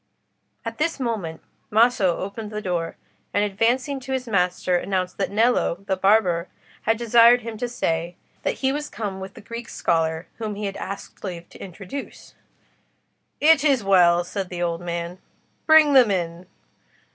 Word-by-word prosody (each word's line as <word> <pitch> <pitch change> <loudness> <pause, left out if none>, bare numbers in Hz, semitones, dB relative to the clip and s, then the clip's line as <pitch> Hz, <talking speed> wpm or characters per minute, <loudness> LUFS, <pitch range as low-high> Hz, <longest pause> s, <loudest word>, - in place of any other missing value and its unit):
At - - -5
this 325 -1 0
moment 210 -11 -3 0.3
Maso 215 -5 +3
opened 205 +3 -5
the 210 - -3
door, 175 -4 -2 0.4
and 205 - +3
advancing 240 +7 0
to 265 +1 -5
his 260 -1 -2
master, 180 -3 +1
announced 185 +1 -2
that 195 - 0
Nello, 210 -4 +1
the 190 - 0
barber, 185 -3 +3 0.4
had 225 0 +3
desired 235 +1 +6
him 230 0 -6
to 245 - -2
say, 170 -7 -2 0.3
that - - -1
he 265 - +4
was 295 +1 -3
come 200 -4 -5
with 190 0 -8
the - - -11
Greek 230 +2 -8
scholar 160 0 0
whom 215 -2 -3
he 210 +1 -4
had 195 -1 -4
asked 200 - -7
leave 175 -3 -6
to - - -11
introduce. 195 +8 -8 1.1
"It 305 -1 +5
is 275 -7 +3
well," 175 -3 +5
said 190 +1 -5
the 175 -1 -3
old 170 0 -2
man. 170 +1 -4 0.5
"Bring 315 -2 +7
them 255 -5 +7
in." 175 -2 -2
200 Hz, 165 wpm, -23 LUFS, 180-235 Hz, 1.1 s, Bring